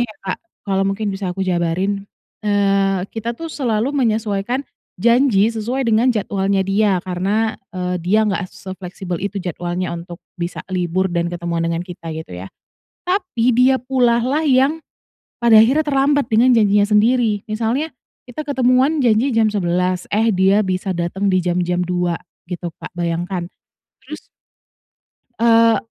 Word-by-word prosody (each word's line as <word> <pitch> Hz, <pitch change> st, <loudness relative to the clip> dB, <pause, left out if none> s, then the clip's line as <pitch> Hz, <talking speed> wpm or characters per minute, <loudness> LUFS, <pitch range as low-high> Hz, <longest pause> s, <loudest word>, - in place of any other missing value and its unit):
ya, 240 Hz, -, 0 dB, 0.2 s
Kak, 190 Hz, -, -3 dB, 0.3 s
kalau 195 Hz, -1 st, 0 dB
mungkin 200 Hz, +1 st, -2 dB
bisa 195 Hz, -1 st, -4 dB
aku 195 Hz, -, -1 dB
jabarin, 185 Hz, +3 st, -1 dB, 0.3 s
eee, 195 Hz, -2 st, +1 dB
kita 230 Hz, +1 st, -4 dB
tuh 330 Hz, +2 st, -7 dB
selalu 245 Hz, 0 st, -1 dB
menyesuaikan 225 Hz, 0 st, 0 dB, 0.4 s
janji 235 Hz, -2 st, +4 dB
sesuai 235 Hz, +3 st, -2 dB
dengan 230 Hz, +3 st, +3 dB
jadwalnya 195 Hz, -2 st, 0 dB
dia 195 Hz, 0 st, +1 dB
karena, 195 Hz, +5 st, -1 dB, 0.2 s
eee, 180 Hz, -1 st, -2 dB
dia 210 Hz, +5 st, +3 dB
nggak 195 Hz, -, -1 dB
sefleksibel 185 Hz, -1 st, -6 dB
itu 200 Hz, 0 st, -3 dB
jadwalnya 180 Hz, 0 st, -3 dB
untuk 170 Hz, 0 st, -9 dB, 0.2 s
bisa 170 Hz, 0 st, -4 dB
libur 185 Hz, 0 st, 0 dB
dan 170 Hz, 0 st, -2 dB
ketemuan 170 Hz, -1 st, -2 dB
dengan 165 Hz, 0 st, -1 dB
kita 175 Hz, -2 st, -7 dB
gitu 155 Hz, -, -7 dB
ya. 90 Hz, -, -7 dB, 0.6 s
Tapi 360 Hz, -, 0 dB
dia 255 Hz, +3 st, +4 dB
pulalah 250 Hz, +2 st, +1 dB
yang 270 Hz, +4 st, +3 dB, 0.6 s
pada 235 Hz, -2 st, +6 dB
akhirnya 260 Hz, +8 st, +5 dB
terlambat 285 Hz, -2 st, +1 dB
dengan 245 Hz, +3 st, +5 dB
janjinya 205 Hz, -2 st, +4 dB
sendiri, 215 Hz, 0 st, +2 dB
misalnya 235 Hz, +8 st, -1 dB, 0.4 s
kita 305 Hz, +5 st, -6 dB
ketemuan 265 Hz, +2 st, +2 dB
janji 235 Hz, +2 st, +2 dB
jam 220 Hz, -1 st, +3 dB
11, 180 Hz, -2 st, -1 dB
eh 225 Hz, +2 st, +3 dB
dia 195 Hz, +2 st, +3 dB
bisa 185 Hz, -1 st, -2 dB
datang 175 Hz, +4 st, -2 dB
di 185 Hz, -2 st, +2 dB
jam-jam 180 Hz, 0 st, 0 dB
2 180 Hz, -1 st, -1 dB, 0.3 s
gitu, 175 Hz, -1 st, -5 dB
Kak, -, -, -10 dB
bayangkan. 175 Hz, +1 st, -3 dB, 0.5 s
Terus, -, -, -8 dB, 1.2 s
eee, 230 Hz, 0 st, +5 dB
205 Hz, 140 wpm, -19 LUFS, 180-235 Hz, 1.2 s, pada